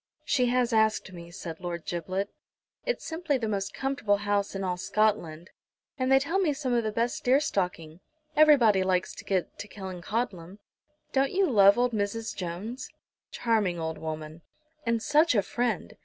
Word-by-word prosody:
"She 250 -3 +2
has 245 -1 +1
asked 220 -3 +2
me," 170 -1 -10
said 165 -1 -7
Lord 170 -2 -5
Giblet. 185 +3 -3 0.5
"It's - - -1
simply 320 -3 -1
the 230 -3 -3
most 200 -2 -2
comfortable 270 -7 0
house 205 -1 -1
in 195 - -3
all 180 -1 -1
Scotland, 180 -5 0 0.4
and 255 -1 -1
they 270 - +7
tell 325 +8 0
me 335 -6 +2
some 275 -3 -2
of 235 -1 +2
the 215 - -1
best 230 +3 -1
deer 260 +3 +4
stalking. 180 - -2 0.4
Everybody 265 -10 +6
likes 185 -1 0
to - - -10
get 190 -3 -2
to 205 - -6
Killancodlem. 190 -1 -4 0.6
Don't 270 0 +2
you 385 0 +3
love 200 -5 +6
old 245 0 +2
Mrs. 220 +1 -2
Jones?" 205 - -5 0.4
"Charming 215 -7 0
old 160 0 -4
woman!" 155 0 -6 0.5
"And 230 -1 +1
such 305 -1 +4
a 205 - +3
friend! 235 -4 -2
210 Hz, 170 wpm, -28 LUFS, 180-250 Hz, 0.6 s, they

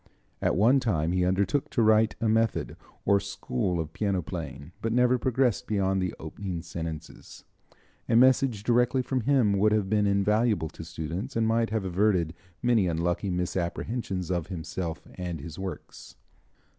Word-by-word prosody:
At - - +1
one 120 +8 +5
time 85 -10 0
he 90 0 +1
undertook 95 +8 +1
to 120 - 0
write 110 0 +4
a 115 - 0
method 110 +1 +1 0.3
or 100 0 +4
school 90 -4 -2
of 80 -1 -4
piano 100 -4 -1
playing, 80 -2 -7
but 115 - -1
never 125 +1 +3
progressed 125 -1 +1
beyond 95 -2 +1
the 90 -1 -2
opening 85 +1 -5
sentences. 80 -2 -7 0.7
A 115 - +3
message 125 -3 +4
directly 125 +3 +2
from 130 0 -1
him 115 -6 +3
would 105 +1 +4
have 105 -3 0
been 105 -1 +3
invaluable 100 -2 +2
to 80 - -10
students, 85 - -5
and 115 -1 +2
might 115 0 +2
have 110 -2 -1
averted 90 -3 +1 0.3
many 115 -6 +3
unlucky 85 +4 -1
misapprehensions 90 +2 -2
of 85 -3 -1
himself 85 -1 -5
and 90 -3 -4
his 75 +3 -8
works. 95 -1 -8
100 Hz, 155 wpm, -27 LUFS, 85-115 Hz, 0.7 s, one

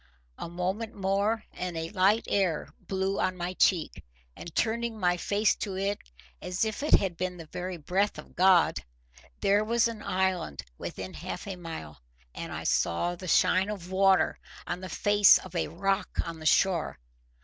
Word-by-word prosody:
A - - -5
moment 190 +6 -3
more 200 +3 0
and 180 -2 -4
a 165 0 -4
light 205 +3 +3
air 185 -6 0 0.2
blew 190 0 -1
on 185 0 0
my 175 +1 -3
cheek, 180 -3 +1 0.3
and, 170 - -10
turning 230 0 0
my 180 -2 +2
face 205 +4 +1
to 195 -2 -4
it 200 +1 -1 0.4
as 180 +4 -1
if 220 +3 -3
it 300 - +4
had 190 -3 +1
been 180 +1 -3
the 165 - -9
very 180 +3 -5
breath 190 +6 0
of - - -11
God, 185 -1 +5 0.6
there 205 +2 +3
was 230 +1 +2
an 225 -2 -6
island 185 - -1 0.2
within 95 0 -6
half 180 +1 -6
a 195 -2 -5
mile, 160 - -8 0.3
and - - -6
I - - -5
saw 85 - +1
the 185 +1 -9
shine 185 +3 +3
of 185 -4 -6
water 190 0 +3 0.3
on 175 +1 -4
the 185 - -6
face 205 -1 +6
of 185 - -10
a 170 - 0
rock 195 +3 -1 0.2
on 165 -1 -6
the 155 - -2
shore. 180 0 +2
185 Hz, 175 wpm, -28 LUFS, 175-200 Hz, 0.6 s, face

